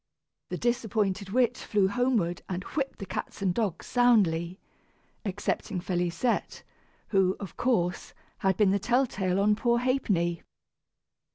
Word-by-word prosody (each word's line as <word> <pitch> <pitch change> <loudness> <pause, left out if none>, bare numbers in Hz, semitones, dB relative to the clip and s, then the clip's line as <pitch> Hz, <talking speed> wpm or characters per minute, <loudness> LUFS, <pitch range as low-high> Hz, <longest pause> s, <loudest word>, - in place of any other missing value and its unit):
The - - -3
disappointed 210 -5 0
witch 245 +2 +2
flew 205 -3 +1
homeward 215 -6 0
and 185 0 -3
whipped 275 +3 -3
the 195 - -6
cats 195 - -5
and 185 -2 +2
dogs 195 -5 -2
soundly 185 -8 +3 0.7
excepting 195 0 -2
Félisette, 175 +5 -1 0.5
who, 190 -2 +3
of 195 -5 -8
course, 185 -8 0 0.2
had 190 -1 +1
been 205 -3 +4
the 200 - +2
tell 245 +6 +2
tale 190 -5 -1
on 210 +1 +4
poor 235 +2 +2
Ha'penny. 205 -10 0
200 Hz, 130 wpm, -28 LUFS, 180-240 Hz, 0.7 s, been